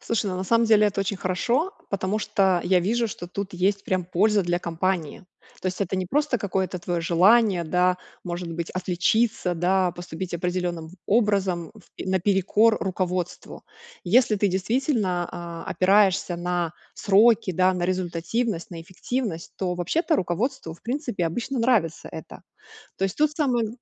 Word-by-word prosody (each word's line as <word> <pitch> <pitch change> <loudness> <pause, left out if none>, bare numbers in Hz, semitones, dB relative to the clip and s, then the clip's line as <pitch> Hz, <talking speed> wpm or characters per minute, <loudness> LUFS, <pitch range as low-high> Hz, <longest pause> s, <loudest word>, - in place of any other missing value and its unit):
Слушай, 230 -2 -1
ну 185 - -3
на 185 - -3
самом 230 +4 +3
деле 215 -1 +5
это 200 -1 -1
очень 200 +1 -2
хорошо, 235 - 0 0.2
потому 195 +1 -1
что 195 -4 +2
я 185 0 +3
вижу, 230 +6 +1
что 215 -4 -7
тут 200 +2 -5
есть 195 +2 0
прям 185 -1 -1
польза 200 +4 +2
для 175 0 0
компании. 175 0 -2 0.4
То - - -3
есть 185 +1 -3
это 190 -1 -1
не 185 - -2
просто 285 +4 +1
какое-то 190 -2 -2
твоё 175 0 -2
желание, 185 +3 +4
да, 180 +2 +2 0.3
может 175 -1 -5
быть, 170 0 -4
отличиться, 185 +2 0
да, 180 +2 +2
поступить 175 +1 -7
определенным 175 -2 -2 0.2
образом, 195 -6 +1
в 205 -2 -11
наперекор 195 +4 +3
руководству. 180 -2 -3 0.4
Если 215 +3 +4
ты 205 - +2
действительно, 190 - 0
а, 170 -1 -7
опираешься 190 -2 +3
на 175 -1 -2 0.2
сроки, 215 +1 +4
да, 185 +2 +3
на 180 -1 -2
результативность, 185 +3 -2
на 170 -2 -7
эффективность, 185 +1 -4
то 180 -2 -2
вообще-то 315 - 0
руководству, 180 - -2
в - - -22
принципе, 245 - -2
обычно 240 +10 -3
нравится 230 -9 +1
это. - - -9 0.6
То - - -2
есть 195 - -1
тут 305 0 +3
самое 255 -7 0
185 Hz, 155 wpm, -24 LUFS, 175-215 Hz, 0.6 s, деле